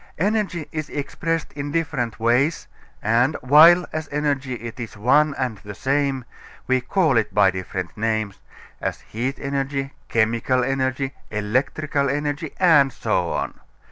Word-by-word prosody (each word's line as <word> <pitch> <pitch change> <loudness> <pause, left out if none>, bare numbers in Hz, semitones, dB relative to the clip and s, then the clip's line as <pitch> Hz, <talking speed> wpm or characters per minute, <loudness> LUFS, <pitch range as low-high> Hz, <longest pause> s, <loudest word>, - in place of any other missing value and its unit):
Energy 195 -4 0
is 155 -1 -4
expressed 165 +3 -3
in 145 0 -5
different 135 -9 -2
ways, 125 +8 +1 0.4
and, 120 +7 +2
while 160 +7 +7
as 155 -1 -4
energy 140 -3 -1
it 115 +1 -8
is 115 -2 -7
one 140 +7 +3
and 125 -6 -2
the 105 -1 -9
same, 135 -1 0 0.4
we 130 0 +2
call 155 0 +2
it 110 - +1
by 100 -2 +5
different 95 -1 -5
names 110 -2 -1 0.4
as - - -3
heat 125 +5 -4
energy, 135 0 -2 0.2
chemical 115 +3 +1
energy, 130 +1 -1 0.2
electrical 135 +7 0
energy, 145 +2 -2
and 155 -7 +5
so - - -1
on. - - -3
135 Hz, 140 wpm, -22 LUFS, 115-150 Hz, 0.4 s, while